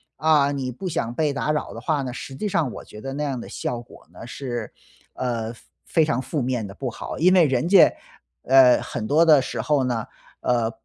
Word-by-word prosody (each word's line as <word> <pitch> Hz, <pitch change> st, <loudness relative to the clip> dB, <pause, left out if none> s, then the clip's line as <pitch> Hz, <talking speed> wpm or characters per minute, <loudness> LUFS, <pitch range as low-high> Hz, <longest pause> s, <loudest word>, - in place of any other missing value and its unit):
啊， 150 Hz, -1 st, +3 dB
你 130 Hz, -2 st, -3 dB
不 185 Hz, +10 st, -6 dB
想 150 Hz, -8 st, -2 dB
被 150 Hz, +2 st, 0 dB
打 150 Hz, -, -1 dB
扰 150 Hz, -, -3 dB
的 -, -, -8 dB
话 155 Hz, -4 st, 0 dB
呢， 130 Hz, -2 st, -4 dB
实 135 Hz, -, -8 dB
际 210 Hz, -, -3 dB
上 165 Hz, -9 st, 0 dB
我 -, -, -9 dB
觉 105 Hz, -, -12 dB
得 135 Hz, +2 st, -5 dB
那 145 Hz, +2 st, -3 dB
样 135 Hz, -4 st, -2 dB
的 -, -, -9 dB
效 120 Hz, -1 st, -4 dB
果 120 Hz, -, -17 dB
呢， -, -, -10 dB
是 120 Hz, -1 st, -5 dB, 0.4 s
呃， 115 Hz, -3 st, -3 dB, 0.3 s
非 160 Hz, -, +2 dB
常 140 Hz, -4 st, 0 dB
负 145 Hz, +2 st, -3 dB
面 125 Hz, -3 st, -1 dB
地 95 Hz, -, -9 dB
不 130 Hz, +5 st, -4 dB
好， 115 Hz, -, -7 dB
因 185 Hz, +3 st, +5 dB
为 180 Hz, -3 st, +6 dB
人 130 Hz, +1 st, 0 dB
家， 195 Hz, +2 st, +7 dB, 0.5 s
呃， 130 Hz, -1 st, +6 dB
很 115 Hz, -3 st, -5 dB
多 155 Hz, +6 st, +4 dB
的 155 Hz, -4 st, +6 dB
时 -, -, -4 dB
候 145 Hz, -3 st, +1 dB
呢， 120 Hz, -4 st, -1 dB, 0.4 s
呃， 120 Hz, -2 st, +1 dB
135 Hz, 240 characters per minute, -23 LUFS, 120-150 Hz, 0.5 s, 家